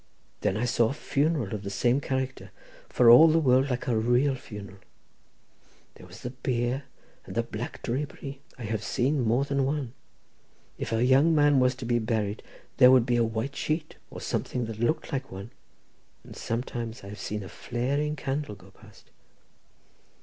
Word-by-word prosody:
Then 95 - 0
I 115 - 0
saw 120 -2 +2
a - - -2
funeral 145 -6 0
of 105 - -3
the 100 - -5
same 125 +6 +1
character, 130 -7 -3 0.4
for 120 -2 +6
all 130 +8 +10
the 160 0 +4
world 135 -3 +3
like 125 -1 -2
a 120 - +1
real 120 +5 +2
funeral; 105 -6 -9 1.1
there - - -14
was - - -13
the 125 - -5
bier 125 +1 -2 0.4
and - - -8
the 115 - +1
black 115 +1 -7
drapery. 135 +1 -4 0.2
I 125 - -8
have 110 0 -3
seen 135 +6 0
more 120 +4 +2
than 140 -1 0
one. 135 -3 -2 0.9
If - - -4
a 115 +2 +2
young 140 +6 +5
man 145 -2 +5
was 125 0 +3
to 125 - -7
be 120 0 +1
buried 110 -2 -1 0.4
there 125 - +8
would 130 -2 +6
be 120 -1 +1
a 120 - +3
white 115 +5 -3
sheet, 155 +1 -3
or - - -8
something 125 -2 -2
that 110 -1 -7
looked 155 +8 -1
like 135 0 -3
one—and 95 - -14
sometimes 115 -1 -4
I 100 - -9
have 105 - -9
seen 105 -1 -4
a - - -8
flaring 140 +9 -2
candle 135 -5 -3
going 95 0 -17
past. 105 -1 -19
125 Hz, 180 wpm, -27 LUFS, 110-135 Hz, 1.1 s, all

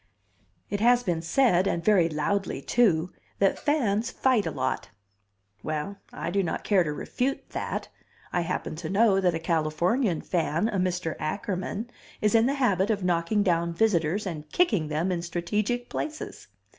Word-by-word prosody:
It 205 - -1
has 245 +2 +4
been 175 -5 -1
said 185 +1 +3
(and 170 -3 -1
very 190 -6 +4
loudly, 165 +3 -1
too) 180 - +2 0.3
that 195 -1 +2
fans 235 -6 +1
fight 250 -9 +2
a - - 0
lot. 130 -2 -2 0.7
Well, 155 +6 -3
I - - -4
do 200 +2 +2
not 170 -4 -3
care 195 -4 +3
to 150 - -2
refute 250 - -3
that; - - -3 0.5
I 175 - +2
happen 170 -2 -3
to 160 -1 -5
know 200 -1 +4
that 180 -3 +2
a - - -2
Californian 165 - +1
fan, 170 +3 0
a 205 - -2
Mr. 180 -3 -1
Ackerman, 195 +7 -3 0.3
is 210 +1 +2
in 225 +1 +5
the 275 - +1
habit 205 -7 +2
of 205 -3 0
knocking 180 +4 +1
down 170 -3 +1
visitors 185 -1 +1
and 155 -5 -6
kicking 210 - +2
them 155 +5 -1
in 175 -2 -1
strategic 210 +8 -2
places. 310 0 -5
185 Hz, 165 wpm, -27 LUFS, 165-215 Hz, 0.7 s, in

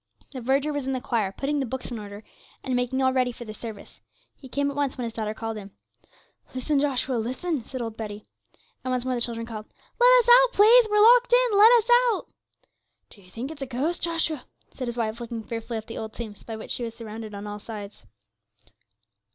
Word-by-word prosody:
The 260 - -6
verger 275 +5 +1
was 285 -2 -3
in 270 - 0
the 260 - -1
choir, 225 -6 -1
putting 285 +7 -2
the 270 - 0
books 260 +1 -5
in 235 - -4
order, 205 0 -9 0.4
and 260 -2 -1
making 250 +2 0
all 260 0 +3
ready 255 -1 +2
for 240 0 -10
the 215 - -7
service. 215 -2 -9 0.3
He 265 - -13
came 285 +2 0
at - - -9
once 285 -2 -1
when 250 - -3
his 230 -1 -4
daughter 220 -1 -3
called 225 -1 -4
him. 200 -1 -10 0.8
'Listen, 275 +3 0
Joshua, 265 -3 0
listen,' 260 +5 -2
said 255 +1 -5
old 225 -1 -6
Betty. 210 -1 -6 0.6
And 255 - -3
once 250 -1 -1
more 260 - 0
the 240 - -2
children 230 -1 -1
called. 220 -2 -8 0.3
'Let - - +7
us - - -11
out, - - +7
please; 450 +3 +7
we're 420 0 +3
locked 485 +2 +6
in; - - +4
let 425 +3 +8
us 470 -1 +3 0.2
out.' 430 - -4 0.8
'Do 205 - -15
ye 180 - -18
think 240 +9 -6
it's 305 -3 -10
a 270 - -3
ghost, 275 +8 -2
Joshua?' 325 -4 0 0.3
said 255 - -5
his 240 0 -4
wife, 225 0 -2
looking 230 -1 -5
fearfully 230 +1 -5
at 220 - -6
the 225 - -7
old 220 0 -6
tombs 220 -4 -7
by 225 - -7
which 220 - -8
she - - -2
was 230 -1 -5
surrounded 220 -2 -8
on 200 +1 -7
all 210 0 -6
sides. 210 -2 -9
250 Hz, 225 wpm, -25 LUFS, 225-285 Hz, 0.8 s, let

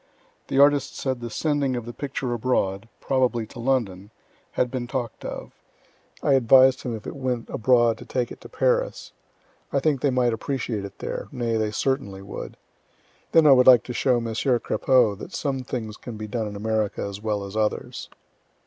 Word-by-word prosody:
The - - -2
artist 145 0 +4
said 130 -3 -2
the 120 - -5
sending 145 +1 0
of 120 -2 -4
the 120 - -7
picture 135 -2 -3
abroad, 110 -3 -1
probably 125 -4 +1
to 120 +3 -12
London, 110 -7 -1 0.4
had 125 -1 0
been 125 -2 -3
talk'd 120 -3 -4
of. - - -6 0.7
I 140 - +3
advised 130 +1 +6
him 120 -2 -3
if 110 - -9
it - - -6
went 125 -4 -2
abroad 120 0 +3
to - - -10
take 125 -2 -2
it - - -10
to - - -11
Paris. - - 0 0.6
I 140 - +2
think 140 -2 +1
they 145 - +3
might 125 -2 +2
appreciate 115 -3 -3
it 100 - -10
there - - -5
nay, 120 -2 -1
they 110 -1 0
certainly 105 -4 -2
would. 100 - -8 0.7
Then 165 -1 +5
I 145 - +8
would 125 -1 +6
like 125 -4 +8
to 125 - -6
show 125 0 +2
Messieur 115 +2 0
Crapeau 125 -2 +2
that 180 - -8
some 140 -3 -1
things 110 -4 -5
can 120 -3 -8
be 110 - -5
done 110 +1 -3
in 105 - -7
America 110 0 -1
as 100 0 -6
well 105 -2 -1
as 100 +1 -9
others. 110 -1 -2
120 Hz, 190 wpm, -24 LUFS, 110-130 Hz, 0.7 s, I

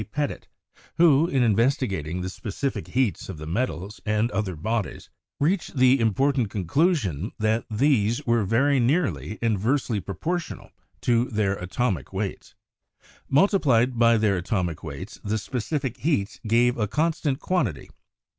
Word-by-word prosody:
Petit, 145 -1 -3 0.5
who, 165 -2 +5
in 135 -6 +1
investigating 105 - +1
the 90 - -3
specific 125 +7 -4
heats 125 -7 -1
of 95 - -6
the 75 - -7
metals 95 - -3
and 110 +1 0
other 95 -3 -2
bodies, 110 +7 -3 0.3
reached 165 0 0
the 130 +1 +5
important 120 +1 +1
conclusion 105 - 0
that 110 +1 0
these 115 -1 +1
were 115 -2 +2
very 130 +7 +2
nearly 115 - 0
inversely 115 +1 +1
proportional 165 - -4 0.3
to 120 0 +2
their 105 -5 0
atomic 90 - -2
weights. - - -5 0.7
Multiplied 135 - +3
by 115 -1 +5
their 105 -3 +2
atomic 90 -3 -2
weights, - - -8
the 105 +2 -1
specific 130 +3 -3
heats 120 -11 -1
gave 120 +2 +3
a 105 - +1
constant 150 +2 0
quan 180 -9 +1
tity. 80 -9 -8
115 Hz, 135 wpm, -25 LUFS, 100-135 Hz, 0.7 s, who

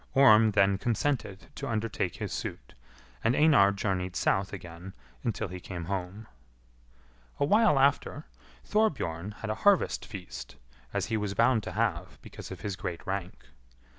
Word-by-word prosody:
Orm 115 -5 +7
then 100 -1 +3
consented 115 -5 -1
to - - -6
undertake 115 -1 -2
his - - -5
suit, - - -6 0.5
and 115 +3 +3
Einar 145 -11 +6
journeyed 95 -3 -2
south 95 +1 +1
again 90 0 -9 0.3
until 110 -1 -2
he 90 0 -7
came 85 -2 -6
home. 95 +3 -4 1.1
A - - +3
while 210 -1 +4
after, 140 +2 +2 0.4
Thorbjorn 110 - 0
had 110 - -1
a 110 - -5
harvest 205 -2 +3
feast, 100 -4 -8 0.4
as - - -1
he 110 - -1
was 105 -2 -3
bound 115 +1 +4
to - - -7
have 95 -5 -1
because - - -10
of - - -8
his 100 -2 -3
great 90 -4 -5
rank. 95 -1 -4
105 Hz, 150 wpm, -29 LUFS, 95-120 Hz, 1.1 s, Orm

